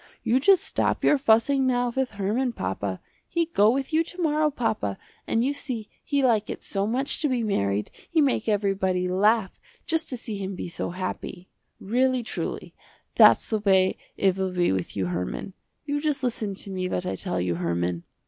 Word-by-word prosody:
You 245 +3 +3
just 375 +5 +5
stop - - 0
your 290 - +4
fussing 260 +3 +3
now 245 -1 +1
with 265 -1 0
Herman, 215 +6 -1
papa. 95 - -3 0.3
He 335 0 +1
go 215 -11 +3
with 270 +5 -1
you 320 +1 +4
to 355 - -10
morrow 305 -2 +2
papa, 220 - -2 0.3
and 230 +2 +1
you 280 - +1
see 250 -7 -5
he 280 -1 0
like 225 -4 +2
it - - -6
so 200 0 -2
much 260 +8 -1
to 300 - +1
be 250 -3 0
married, 105 - 0 0.2
he 330 - +2
make 265 -6 +2
everybody 190 -3 +1
laugh 195 +2 +2 0.3
just 325 0 -1
to 255 - -3
see 220 -3 -6
him 195 0 -4
be 175 - -5
so - - -4
happy. 185 0 -5 0.3
Really 255 +3 +1
truly, - - -5 0.4
that's - - +6
the 220 - 0
way 190 -2 +3 0.2
it 190 -1 +2
will 190 -1 -1
be 180 -1 +2
with 95 +1 -3
you 95 - 0
Herman. 90 - -4 0.3
You 290 0 -1
just 300 -3 -1
listen 225 -5 -2
to 195 - -5
me 185 -1 -2
what 90 - -2
I 95 - -2
tell 90 -1 -2
you 90 0 0
Herman." 85 0 -1
215 Hz, 195 wpm, -25 LUFS, 185-265 Hz, 0.4 s, that's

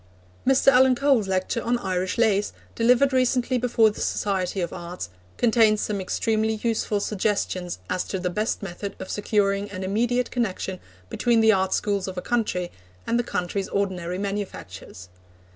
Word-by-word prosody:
Mr. 270 +1 +5
Alan 260 0 +5
Cole's 265 -6 +2
lecture 190 +4 -1
on 240 +1 +1
Irish 185 -4 -2
lace, 210 -3 +2 0.2
delivered 250 +4 +3
recently 255 0 +2
before 230 -3 +3
the - - -8
Society 195 -1 -1
of 175 -2 -2
Arts, 175 - -7 0.3
contains 225 -2 +4
some 205 -2 -2
extremely 220 +3 0
useful 225 -2 0
suggestions 200 -3 -1
as 185 - -1
to 190 - -3
the 180 -1 -2
best 215 +3 -2
method 195 +1 -6
of 190 - -7
securing 205 -1 0
an 190 -1 -6
immediate 240 +6 0
connection 190 -5 -2 0.3
between 235 -2 +2
the 220 0 +6
art 190 -2 +1
schools 200 -2 0
of 185 -1 -6
a - - -2
country 210 -7 -1 0.3
and 235 - +1
the - - +1
country's 190 -2 -3
ordinary 180 -3 -2
manufactures. 190 - -6
205 Hz, 160 wpm, -24 LUFS, 185-235 Hz, 0.3 s, the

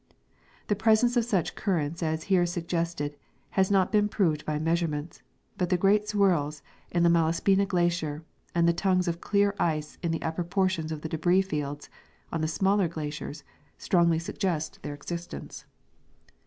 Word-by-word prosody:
The 205 - +1
presence 225 +3 +3
of 240 -2 +3
such 195 -9 0
currents 165 -5 -1
as 160 -1 -1
here 180 -3 +3
suggested 170 -3 -2 0.4
has 190 -1 +2
not 195 -2 +3
been 210 -1 +3
proved 160 -8 0
by 155 -1 0
measurements, 160 -1 -1 0.4
but 180 -2 +1
the 180 - +3
great 205 +3 +3
swirls 170 -8 +1 0.3
in 170 -1 +1
the 170 - +5
Malasj^ina 170 +4 +3
glacier 170 -4 0 0.3
and 170 0 +4
the 170 - +4
tongues 185 0 +1
of 170 0 -2
clear 200 -1 +2
ice 155 -3 -1
in 170 - -1
the 165 -1 -2
upper 160 +2 -2
portions 180 -3 0
of 155 -1 -4
the 160 - -5
debris 175 +4 +2
fields 145 -5 -4 0.4
on 165 - -2
the 155 - +1
smaller 190 +4 +2
glaciers 150 -1 -6 0.3
strongly 170 -2 +3
suggest 165 -1 -3
their 145 0 -5
existence. 170 - -7
170 Hz, 160 wpm, -28 LUFS, 155-190 Hz, 0.4 s, the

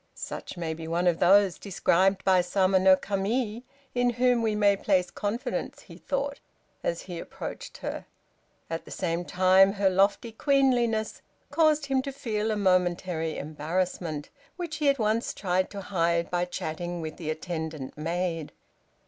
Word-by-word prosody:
"Such - - -7
may 165 -2 -2
be 160 0 -7
one 170 +2 0
of 175 -2 +2
those 195 0 +5
described 195 0 +2
by 185 -1 +5
Sama 190 +1 +2
no 190 0 +7
Kami, 210 +4 -2 0.3
in 245 0 +2
whom 245 0 +3
we 220 -2 +1
may 205 -1 +4
place 185 -2 +1
confidence," 225 +6 -3
he - - -13
thought, 280 0 -3 0.4
as 170 - -2
he 175 -3 -6
approached - - -7
her. - - -5 0.6
At 165 0 -5
the - - -12
same 170 +1 -2
time, 185 +2 +5
her 200 -2 +2
lofty 200 +4 +2
queenliness 240 -4 +1 0.3
caused 310 -2 +3
him 270 -1 +1
to 275 - -5
feel 225 -6 -2
a 215 - +1
momentary 180 -4 +1
embarrassment, 155 0 -3 0.2
which 340 -4 -5
he 295 -1 +3
at 275 - +2
once 220 0 0
tried 185 -1 0
to 200 - -7
hide 170 -3 0
by 175 0 +1
chatting 175 0 -4
with 155 -1 -6
the 160 -3 -5
attendant 160 -3 -4
maid. 165 0 -2
190 Hz, 155 wpm, -27 LUFS, 170-220 Hz, 0.6 s, no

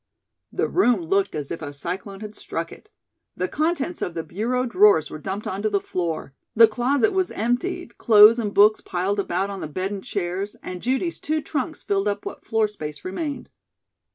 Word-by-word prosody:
The - - 0
room 245 - +3
looked 195 +3 +1
as 145 -2 -4
if 165 - -4
a 145 -2 -6
cyclone 190 +6 -5
had 210 -1 -7
struck 165 -5 -5
it. 425 - -14 0.5
The - - 0
contents 330 +1 -1
of 175 - -3
the 165 - -2
bureau 235 +10 -1
drawers 195 - +4
were 155 - -6
dumped 195 +5 -4
onto 200 +3 -1
the 200 -1 +1
floor; 165 -7 -3 0.2
the 230 0 +8
closet 265 - +1
was 375 -1 +1
emptied, 340 - -2
clothes 220 0 +7
and 210 -3 -1
books 210 +2 +5
piled 190 +3 -1
about 195 +1 -1
on 195 - -6
the - - -4
bed 185 +6 -3
and 200 -2 -5
chairs, 195 +1 -3
and 180 -1 -6
Judy's 265 +8 -1
two 310 +1 -1
trunks 310 +1 -4
filled 200 0 0
up 205 0 -2
what - - -8
floor 225 -1 +2
space 150 -8 -8
remained. 285 - -4
205 Hz, 190 wpm, -23 LUFS, 185-245 Hz, 0.5 s, the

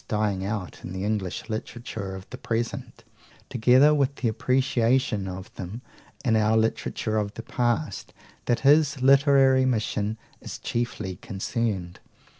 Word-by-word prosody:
dying 105 -4 0
out 100 -2 -4
in 90 - -6
the 95 0 -4
English 105 -3 -2
literature 110 -3 -5
of 95 0 -10
the - - -6
present, 120 +1 -3 0.5
together 130 +4 +5
with 140 -2 +1
the 125 - -1
appreciation 125 -2 +1
of 95 0 -7
them 100 +7 -7 0.4
in 115 -3 +3
our 110 0 +3
literature 110 0 0
of 105 -1 -2
the 115 - -7
past 120 -6 -1 0.3
that 120 - +1
his 140 -1 +4
literary 135 -1 +5
mission 110 -3 -1 0.2
is - - -7
chiefly 110 -6 -3
concerned. 100 -3 -3
115 Hz, 135 wpm, -26 LUFS, 100-130 Hz, 0.5 s, together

